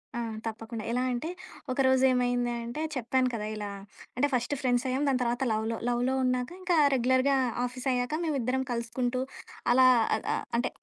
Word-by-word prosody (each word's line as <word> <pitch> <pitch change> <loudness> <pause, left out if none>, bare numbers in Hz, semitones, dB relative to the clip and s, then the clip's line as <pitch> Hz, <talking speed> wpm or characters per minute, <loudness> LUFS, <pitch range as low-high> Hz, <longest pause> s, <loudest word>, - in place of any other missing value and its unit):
ఆ! - - -2 0.3
తప్పకుండా. 225 0 -5
ఎలా 250 +1 +1
అంటే, 245 +7 -3 0.4
ఒకరోజు 260 0 +3
ఏమైంది 245 -1 +1
అంటే 240 +7 -5
చెప్పాను 255 +1 +1
కదా! 210 -2 -3
ఇలా 210 -1 -4 0.5
అంటే 285 +3 +3
ఫస్ట్ 250 +3 0
ఫ్రెండ్స్ 245 -1 +1
అయ్యాం. 260 +2 0
దాని 260 - +2
తర్వాత 240 +2 0
లవ్‌లో. 220 +1 -1
లవ్‌లో 245 +2 +1
ఉన్నాక 250 -1 0
ఇంకా 360 -1 +1 0.2
రెగ్యులర్‌గా 260 +2 +3 0.3
ఆఫీస్ 255 +2 -5
అయ్యాక 245 +3 -1
మేమిద్దరం 265 -5 0
కలుసుకుంటూ 245 +2 -1 0.5
అలా 255 +1 +6 0.5
ఆహ్, - - -2
అంటే 240 - 0
250 Hz, 155 wpm, -29 LUFS, 240-260 Hz, 0.5 s, అలా